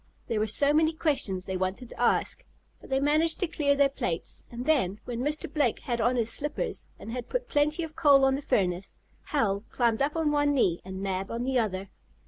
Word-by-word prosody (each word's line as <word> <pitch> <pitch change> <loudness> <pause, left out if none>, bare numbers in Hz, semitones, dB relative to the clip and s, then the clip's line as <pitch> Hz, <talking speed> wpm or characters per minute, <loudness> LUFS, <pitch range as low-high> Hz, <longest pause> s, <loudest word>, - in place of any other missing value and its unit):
There 225 - -1
were 215 - +1
so 280 +7 +2
many 315 +1 +3
questions 265 - 0
they 190 -1 -2
wanted 190 +7 -3
to - - -8
ask. - - +1 0.4
But - - -15
they 265 0 +2
managed 310 +3 +2
to 365 - +1
clear 295 -3 +1
their 280 0 +5
plates, 175 -11 -4
and 240 +1 -6
then, 230 -11 +2
when 240 -1 -4
Mr. 295 +4 -1
Blake 285 -6 +1
had 240 -2 -2
on 245 +3 +2
his 230 -2 0
slippers, 295 +1 -3
and 225 - -8
had 245 0 -5
put - - -2
plenty 300 -2 +1
of 315 -1 -7
coal 285 -4 +6
on 270 - +3
the 275 - -2
furnace, 190 -8 0 0.3
Hal 205 -8 0
climbed 235 -2 +1
up 290 +3 +1
on 320 -2 +1
one 290 -1 +2
knee, 180 -10 +2
and 190 +1 -6
Mab 190 0 -2
on 230 +1 -3
the 260 0 +1
other. 195 -3 -2
260 Hz, 220 wpm, -28 LUFS, 210-295 Hz, 0.4 s, coal